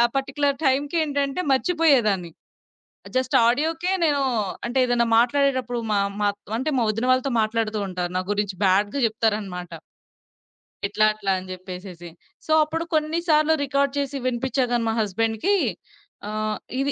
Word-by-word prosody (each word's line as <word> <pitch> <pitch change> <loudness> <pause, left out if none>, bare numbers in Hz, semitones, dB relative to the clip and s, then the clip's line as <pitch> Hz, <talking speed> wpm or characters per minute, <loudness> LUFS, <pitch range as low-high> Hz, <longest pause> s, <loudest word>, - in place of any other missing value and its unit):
Particular 275 +1 0
టైంకేంటంటే 285 +2 0
మర్చిపోయేదాన్ని. 260 - +2 0.8
Just 255 0 0
ఆడియోకే 320 +8 0
నేను 290 -3 +2 0.4
అంటే 240 +2 -3
ఏదైనా 240 -1 +2
మాట్లాడేటప్పుడు 255 -1 +1 0.8
అంటే 275 +5 -1
మా 250 - +2
మా - - +2
వదిన 225 +3 -1
వాళ్ళతో 255 +1 +1
మాట్లాడుతూ 220 0 -1
ఉంటాను 180 -1 -4
నా 185 - +1
గురించి 205 -2 -1
బ్యాడ్‌గా 205 +7 +2
చెప్తారనమాట. 210 -5 -2 1.1
ఇట్లా, 215 +1 +2
అట్లా 200 -2 -2
అని 185 0 -8
జెప్పేసేసి. 180 -1 -8 0.4
సో, - - -4
అప్పుడు 325 +2 -3
కొన్ని 310 +2 +1
సార్లు 305 0 +4
రికార్డ్ 280 0 0
చేసి 280 0 -2
వినిపిచ్చా 255 +1 0
గాని 235 -1 +1
మా 225 - 0
హస్బెండ్‌కి 225 - 0 0.7
ఆహ్, 215 0 -2 0.2
ఇది 275 +1 0
245 Hz, 130 wpm, -23 LUFS, 210-280 Hz, 1.1 s, సార్లు